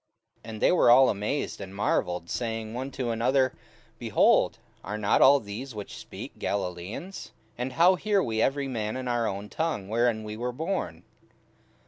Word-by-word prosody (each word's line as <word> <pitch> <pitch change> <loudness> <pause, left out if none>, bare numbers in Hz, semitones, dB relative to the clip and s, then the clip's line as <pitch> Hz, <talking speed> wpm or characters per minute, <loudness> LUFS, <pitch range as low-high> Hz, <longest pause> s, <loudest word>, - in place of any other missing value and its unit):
44:002:007 - - -10
And 110 -1 -7
they - - +5
were 180 - +4
all 130 +2 +7
amazed 105 +5 -2
and 95 0 -8
marvelled, 90 -4 0
saying 115 +1 -3
one 130 +3 -4
to 130 -3 -3
another, 130 +3 +2 0.5
Behold, - - +3 0.3
are 105 +4 -4
not 105 -1 +2
all 140 +1 +7
these 110 +4 -7
which 105 -1 -7
speak - - -9
Galilaeans? 100 - -4 0.2
44:002:008 - - -38
And 125 +1 -3
how 175 +6 +6
hear 200 +1 +1
we 110 -1 -1
every 140 +2 +1
man 110 -2 -3
in 130 -1 -5
our 120 -2 0
own 100 +1 -4
tongue, 130 -10 -3
wherein 115 -1 +1
we 105 0 -6
were 120 +3 -3
born? 140 - -3
115 Hz, 175 wpm, -27 LUFS, 105-135 Hz, 0.5 s, all